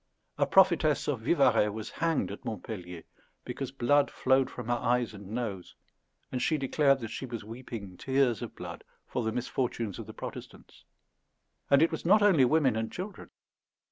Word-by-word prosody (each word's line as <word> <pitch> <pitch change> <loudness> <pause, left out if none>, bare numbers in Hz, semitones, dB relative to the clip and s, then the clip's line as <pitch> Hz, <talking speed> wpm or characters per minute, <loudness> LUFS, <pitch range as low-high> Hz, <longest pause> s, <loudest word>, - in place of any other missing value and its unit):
A - - +3
prophetess - - +4
of - - -1
Vivarais 105 - +3
was 110 +1 -6
hanged 165 -7 0
at 100 - -8
Montpellier 90 -6 -6 0.4
because 130 +1 -5
blood 140 +2 +3
flowed 130 0 +2
from 125 - -7
her 120 - 0
eyes 120 -1 0
and 100 -2 -10
nose, 105 -5 -4 0.6
and 125 - -2
she 155 +4 +2
declared 135 0 +3
that 115 - -5
she 130 - -5
was 115 -3 -6
weeping 110 -4 -8
tears 130 -5 +1
of - - -7
blood - - -8 0.2
for 125 - -3
the 110 - 0
misfortunes 120 -4 -2
of - - -7
the - - -9
Protestants. - - -10 0.8
And 140 +2 +6
it 165 - +3
was 160 - -4
not 205 +4 +5
only 175 -11 +6
women 135 -3 +3
and 110 0 -2
children. 195 +3 -7
125 Hz, 170 wpm, -29 LUFS, 110-140 Hz, 0.8 s, And